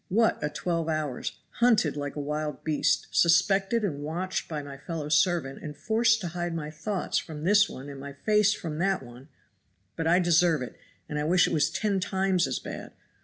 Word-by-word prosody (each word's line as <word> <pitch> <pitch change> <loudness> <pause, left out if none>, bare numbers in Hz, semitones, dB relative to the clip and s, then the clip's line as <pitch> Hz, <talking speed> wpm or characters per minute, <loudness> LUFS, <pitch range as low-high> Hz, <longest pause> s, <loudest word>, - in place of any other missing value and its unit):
What 225 +4 +2
a 150 - -1
twelve 165 +2 -2
hours! 155 -4 -2 0.3
hunted 225 - +4
like 145 -1 -4
a - - -4
wild 150 -1 -3
beast, 155 -2 +1
suspected 195 +6 +3
and 150 -8 -2
watched 180 +5 -3
by 150 -3 -4
my 140 -1 -8
fellow 150 +1 -5
servant 150 -2 +2
and 150 -1 -7
forced 225 0 +2
to 175 - -3
hide 175 0 -3
my 155 -2 -4
thoughts 190 +5 -2
from 155 -2 -8
this 205 +3 +5
one 135 +2 -8
and 140 -1 -8
my 140 +1 -7
face 210 +7 +3
from 160 -6 -4
that 190 -3 +1
one; 125 +4 -13 0.7
but 165 - -2
I 170 +2 +5
deserve 170 -4 +3
it 125 - -8 0.3
and 150 - -3
I - - -1
wish 180 +3 +4
it - - -2
was 150 -3 +3
ten 205 -2 0
times 190 -2 +1
as 130 - -2
bad. - - -8
165 Hz, 200 wpm, -27 LUFS, 150-190 Hz, 0.7 s, this